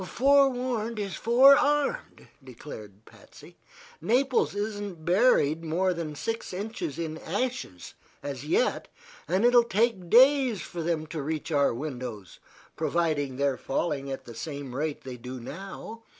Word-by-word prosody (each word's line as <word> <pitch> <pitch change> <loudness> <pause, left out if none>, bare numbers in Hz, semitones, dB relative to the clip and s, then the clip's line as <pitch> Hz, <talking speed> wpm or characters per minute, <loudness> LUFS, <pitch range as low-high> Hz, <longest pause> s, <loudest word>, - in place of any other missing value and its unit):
"Forewarned 250 -1 +2
is 200 -3 -3
forearmed," 280 - +3 0.2
declared 110 -5 -11
Patsy. - - -17 0.4
"Naples 245 - +1
isn't 205 -5 -4
buried 175 - +3
more 180 +4 0
than 165 -3 -5
six 225 +9 -4
inches 195 -6 -5
in 160 -1 -4
ashes, 205 - -4 0.3
as 140 -2 -5
yet, 170 +11 0 0.4
and 190 +6 +1
it 245 - +5
will 240 -1 +7
take 215 -5 0
days 260 -1 +5
for 170 0 -6
them 160 -1 -1
to 155 0 -5
reach 155 +3 -4
to 155 - +1
our 140 - +3
windows, 125 - -7 0.4
provided 150 -6 -1
they're 140 -2 +1
falling 140 -1 -2
at 135 - -6
the 120 - -10
same 140 0 -6
rate 150 +2 -3
they 130 -2 -7
do 125 +2 -8
now. 195 - -8
170 Hz, 140 wpm, -27 LUFS, 140-230 Hz, 0.4 s, will